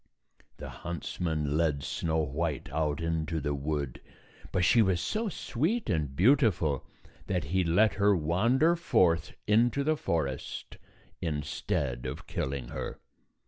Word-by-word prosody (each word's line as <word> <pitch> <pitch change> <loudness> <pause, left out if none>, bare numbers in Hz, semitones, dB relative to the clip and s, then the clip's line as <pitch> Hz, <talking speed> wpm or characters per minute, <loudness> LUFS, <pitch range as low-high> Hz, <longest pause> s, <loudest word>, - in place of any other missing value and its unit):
The - - -7
huntsman 80 -3 -2
led 75 -4 +1
Snow 80 -1 -1
White 75 0 -2
out 75 0 0
into 80 -1 -1
the 75 0 -1
wood, 70 -2 -3 0.5
but 90 -1 +2
she 115 +7 +5
was 95 -4 +2
so 220 - -1
sweet 170 - -1
and 75 -5 -1
beautiful 90 - +3 0.4
that 90 -4 0
he 90 +6 +1
let 90 +4 +4
her 100 +2 +3
wander 115 - +3
forth 85 - +2
into 120 +6 +3
the 155 +2 +2
forest 75 - -3 0.4
instead 70 -5 -2
of 75 +7 -6
killing 65 -2 -3
her. - - -5
85 Hz, 130 wpm, -29 LUFS, 75-105 Hz, 0.5 s, she